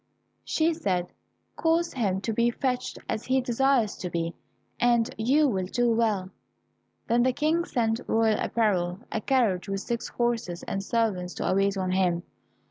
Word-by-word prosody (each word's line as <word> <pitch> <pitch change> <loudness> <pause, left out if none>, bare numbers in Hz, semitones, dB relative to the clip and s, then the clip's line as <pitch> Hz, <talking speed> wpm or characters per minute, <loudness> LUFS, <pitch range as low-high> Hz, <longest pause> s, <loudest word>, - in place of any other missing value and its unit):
She 330 +1 +1
said, 185 - -2 0.4
"Cause 335 +1 +1
him 195 -7 0
to 225 +3 -2
be 235 +2 +3
fetched 250 +1 -2
as 220 - -3
he 260 +1 +2
desires 255 -2 +2
to 180 - -4
be, 170 0 -2 0.5
and 235 -1 +2
you 275 +7 +3
will 190 -7 -1
do 240 +3 +1
well." 215 -5 +1 0.8
Then 235 +1 +3
the 255 +1 +3
King 310 +5 +1
sent 230 -4 0
royal 225 -1 +2
apparel, 190 -4 0
a 220 - -2
carriage 215 -9 +1
with 195 0 -2
six 235 +1 -3
horses, 230 -8 -2
and 195 - -3
servants 195 -5 -1
to - - 0
wait 195 0 +2
on 185 -1 -1
him. 180 -2 +1
225 Hz, 160 wpm, -27 LUFS, 190-250 Hz, 0.8 s, be